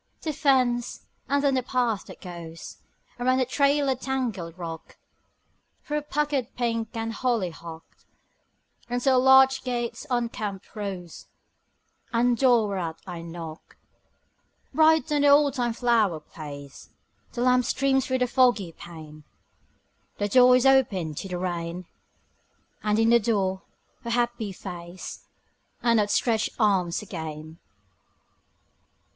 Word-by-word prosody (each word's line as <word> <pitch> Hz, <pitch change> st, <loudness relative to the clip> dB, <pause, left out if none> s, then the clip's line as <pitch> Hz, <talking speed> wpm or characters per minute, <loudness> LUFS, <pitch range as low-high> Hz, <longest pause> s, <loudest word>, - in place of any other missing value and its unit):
The 310 Hz, -, -2 dB
fence; 255 Hz, -4 st, +1 dB, 0.2 s
and 280 Hz, 0 st, +2 dB
then 280 Hz, -1 st, +3 dB
the 260 Hz, -, +2 dB
path 240 Hz, -4 st, -1 dB
that -, -, -12 dB
goes 170 Hz, -2 st, -9 dB, 0.4 s
Around 255 Hz, +1 st, +2 dB
a 255 Hz, -, +2 dB
trailer 280 Hz, +1 st, +2 dB
tangled 240 Hz, -10 st, -3 dB
rock, 165 Hz, -2 st, -8 dB, 0.9 s
Through 300 Hz, 0 st, -2 dB
puckered 290 Hz, -4 st, 0 dB
pink 230 Hz, -1 st, -2 dB
and 225 Hz, 0 st, -3 dB
hollyhock, 175 Hz, -9 st, -3 dB, 1.0 s
Unto 245 Hz, +2 st, +1 dB
a 255 Hz, -1 st, +4 dB
latch 265 Hz, 0 st, +6 dB
gate's 245 Hz, +2 st, -3 dB
unkempt 225 Hz, -5 st, -3 dB
rose, 190 Hz, -6 st, -6 dB, 0.8 s
And 240 Hz, +1 st, +2 dB
door 240 Hz, -3 st, +4 dB
whereat 175 Hz, -5 st, -3 dB
I 175 Hz, -3 st, -7 dB
knock. 165 Hz, -1 st, -9 dB, 1.0 s
Bright 315 Hz, 0 st, +4 dB
on 295 Hz, -1 st, +2 dB
the 290 Hz, -, +4 dB
oldtime 280 Hz, -5 st, +4 dB
flower 225 Hz, -8 st, +2 dB
place 145 Hz, -3 st, -10 dB, 0.4 s
The 240 Hz, -, -2 dB
lamp 250 Hz, -1 st, +3 dB
streams 265 Hz, +1 st, +1 dB
through 260 Hz, -, +1 dB
the -, -, -5 dB
foggy 240 Hz, -8 st, +3 dB
pane; 155 Hz, -3 st, -12 dB, 0.9 s
The 205 Hz, -, 0 dB
door 250 Hz, +3 st, +7 dB
is 250 Hz, +1 st, +2 dB
opened 200 Hz, -, +3 dB
to -, -, -4 dB
the 180 Hz, -1 st, -4 dB
rain: 175 Hz, 0 st, -4 dB, 1.0 s
And 210 Hz, 0 st, +1 dB
in 225 Hz, 0 st, +3 dB
the 235 Hz, -, +6 dB
door 195 Hz, -4 st, 0 dB, 0.4 s
her 235 Hz, -, -5 dB
happy 235 Hz, -3 st, -1 dB
face 175 Hz, -1 st, -9 dB, 0.6 s
And 230 Hz, -2 st, +4 dB
outstretched 215 Hz, +2 st, +1 dB
arms 195 Hz, -4 st, +1 dB
again. 160 Hz, -3 st, -7 dB
230 Hz, 125 wpm, -26 LUFS, 180-255 Hz, 1.0 s, door